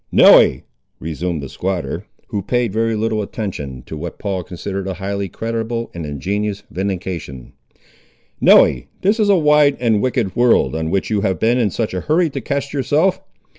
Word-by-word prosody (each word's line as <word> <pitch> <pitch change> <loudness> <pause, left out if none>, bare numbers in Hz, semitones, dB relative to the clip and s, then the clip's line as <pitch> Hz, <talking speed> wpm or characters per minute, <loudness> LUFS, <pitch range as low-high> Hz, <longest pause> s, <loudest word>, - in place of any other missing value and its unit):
"Nelly," - - +6 0.4
resumed 80 0 -3
the - - -5
squatter, 90 +6 -4 0.2
who 100 - -2
paid 120 +1 -1
very 115 0 0
little 110 0 -1
attention 75 - -5
to - - -7
what 85 +2 -6
Paul 95 -3 -3
considered 95 +2 -5
a 95 - -3
highly 100 0 -3
creditable 115 +2 -3
and 85 -3 -6
ingenious 100 +8 -3
vindication, 90 -8 -5 0.9
"Nelly, - - +5 0.2
this 205 +4 +2
is 210 -1 +3
a 200 - +6
wide 150 -2 +4
and 115 -3 +2
a - - 0
wicked 120 -6 -1
world, 120 -8 +3
on 80 0 -2
which 95 +5 -1
you 105 -2 +1
have 95 -1 0
been 120 +3 +2
in 115 -4 +2
such 110 -2 -3
a 90 - -2
hurry 160 +1 +1
to 135 - -4
cast 140 +3 -3
yourself. 150 +7 +1
105 Hz, 175 wpm, -19 LUFS, 90-120 Hz, 0.9 s, Nelly